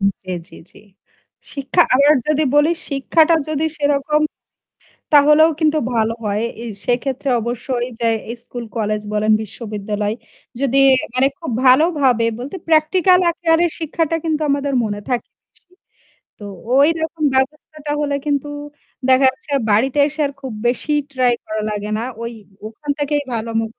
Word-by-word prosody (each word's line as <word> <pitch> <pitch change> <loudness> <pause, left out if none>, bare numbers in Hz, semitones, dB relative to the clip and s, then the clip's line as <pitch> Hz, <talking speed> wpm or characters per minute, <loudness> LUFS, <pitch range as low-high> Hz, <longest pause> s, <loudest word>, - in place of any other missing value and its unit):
জ্বী, 195 -1 -2 0.2
জ্বী, - - -13
জ্বী, - - -18 0.7
শিক্ষা 280 +5 +2
আবার 285 +3 +5
যদি 305 0 +2
বলি 295 +3 +4 0.2
শিক্ষাটা 315 +4 +3
যদি 310 +1 0
সেরকম 290 +1 +1 0.9
তাহলেও 300 +2 +6
কিন্তু 310 -1 +2 0.2
ভালো 225 0 +1
হয়। 210 +1 -1 0.2
এ - - -6 0.2
সেক্ষেত্রে 260 +2 -1
অবশ্যই 240 +1 -3
যে 235 - +1 0.2
এই 235 - -5
স্কুল 245 -1 -7
কলেজ 215 -1 -1
বলেন 215 +1 +2
বিশ্ববিদ্যালয় 210 -1 -4 0.5
যদি 275 0 +1 0.4
মানে 255 +1 +3
খুব 330 - -6 0.2
ভালোভাবে 260 -4 +4
বলতে 270 +10 -6
প্র্যাকটিক্যাল 360 +4 +4
আকারে 335 0 +2
শিক্ষাটা 325 0 -1
কিন্তু 315 -2 -1
আমাদের 280 0 0
মনে 205 -1 -3
থাকে 245 -2 -2 0.2
বেশি। 365 - -29 0.7
তো 210 - -10 0.3
ঐরকম 320 +3 +2
ব্যবস্থাটা 295 +2 -2
হলে 285 -1 0
কিন্তু 290 0 0 0.6
দেখা 260 +1 +5
যাচ্ছে 300 -2 -12 0.2
বাড়িতে 255 +7 +2
এসে 305 +1 -8
আর 280 - -5
খুব 265 -3 -6 0.2
বেশি 255 +5 -1 0.2
ট্রাই 250 -2 +2
করা 215 0 -3
লাগে 210 0 -4
না। 230 - -3 0.2
ওই 235 0 -4 0.4
ওখান 285 +7 -7
থেকেই 290 0 0
ভালো 230 0 -3
মু - - -1
275 Hz, 145 wpm, -19 LUFS, 235-305 Hz, 0.9 s, তাহলেও